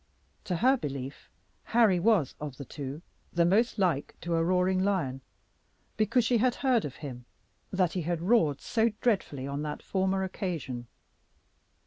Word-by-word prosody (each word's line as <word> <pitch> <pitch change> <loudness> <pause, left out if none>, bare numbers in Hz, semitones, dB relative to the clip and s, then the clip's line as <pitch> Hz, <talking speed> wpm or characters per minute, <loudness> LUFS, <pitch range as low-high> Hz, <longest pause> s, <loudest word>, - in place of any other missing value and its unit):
To 180 - -1
her 260 +9 +4
belief, 140 - -6 0.4
Harry 225 -6 +4
was, 195 - +3
of 145 -4 -5
the 140 - -7
two, 140 +4 -7 0.3
the 170 0 +3
most 220 +8 +3
like 175 -8 0
to 170 0 -2
a 165 0 +2
roaring 185 +2 +2
lion, 165 -10 0 0.7
because 220 +2 +2
she 240 0 +3
had 250 +1 +2
heard 250 -4 +3
of 140 - -6
him 125 -3 -7 0.4
that 185 -3 +1
he 185 - -1
had 170 +1 -1
roared 170 - +2
so 230 0 +2
dreadfully 185 - 0
on 140 +1 -3
that 150 0 -5
former 190 0 0
occasion. 160 - -4
180 Hz, 155 wpm, -29 LUFS, 145-210 Hz, 0.7 s, her